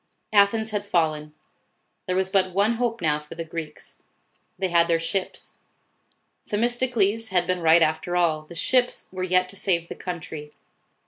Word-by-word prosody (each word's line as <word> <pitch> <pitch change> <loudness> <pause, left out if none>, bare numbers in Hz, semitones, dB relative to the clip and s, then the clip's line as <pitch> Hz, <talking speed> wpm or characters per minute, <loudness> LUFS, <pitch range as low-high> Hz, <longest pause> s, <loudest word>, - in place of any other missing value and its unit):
Athens 215 +2 +4
had 205 -1 -2
fallen. 155 -5 0 0.8
There 185 - 0
was 190 0 0
but 185 -2 +1
one 215 +4 +2
hope 235 -3 -1
now 150 -1 +2
for 150 0 -12
the 165 0 -5
Greeks, 160 -2 -8 0.6
They 190 0 -1
had 170 -1 +4
their 165 -1 +3
ships. 185 +3 -3 0.9
Themis 235 +4 +1
tocles 225 -3 0
had 180 -2 +2
been 185 0 -1
right 165 +1 +6
after 160 +3 -1
all. 165 -3 +2
The 155 +3 -13
ships 250 +8 +1
were 185 0 -6
yet 185 0 +2
to 200 - -7
save 170 -4 0
the - - -6
country. 160 -4 -7
185 Hz, 170 wpm, -24 LUFS, 165-205 Hz, 0.9 s, right